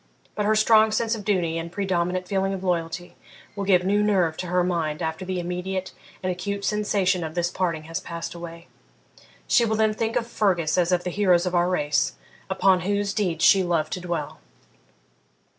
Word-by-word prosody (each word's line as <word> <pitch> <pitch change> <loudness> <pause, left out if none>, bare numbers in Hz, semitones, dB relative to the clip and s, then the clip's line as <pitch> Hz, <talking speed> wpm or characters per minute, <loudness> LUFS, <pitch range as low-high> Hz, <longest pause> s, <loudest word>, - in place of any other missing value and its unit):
But 210 -1 -1
her 215 - +3
strong 220 0 +5
sense 225 +1 0
of 220 -3 -4
duty 175 -5 0
and 165 0 -6
predominant 180 -1 -1
feeling 195 0 0
of 190 - -7
loyalty 175 -1 -2 0.4
will 200 -1 -3
give 185 -2 +4
new 205 +2 +2
nerve 190 -6 +2
to 180 - -4
her 180 +1 +2
mind 165 -4 -1
after 160 +3 -3
the 185 -1 -2
immediate 180 +2 -4 0.3
and 185 - 0
acute 200 +3 -4
sensation 200 -4 +1
of 160 0 -6
this 175 0 0
parting 170 -4 -2
has 165 +3 -4
passed 170 0 -6
away. 170 0 -9 0.8
She 240 - +4
will 220 -1 +1
then 220 0 +2
think 225 +2 -2
of 240 -2 +1
Fergus 185 -9 +1
as 180 -1 +2
of 180 -1 +2
the 180 - -3
heroes 185 -2 +3
of 180 - -2
our 175 0 +2
race, 150 -5 +1 0.4
upon 190 -1 +3
whose 200 +2 -1
deeds 180 -6 0
she 195 - +6
loved 165 -4 0
to 180 - -4
dwell.' 170 -4 -4
180 Hz, 195 wpm, -24 LUFS, 170-200 Hz, 0.8 s, she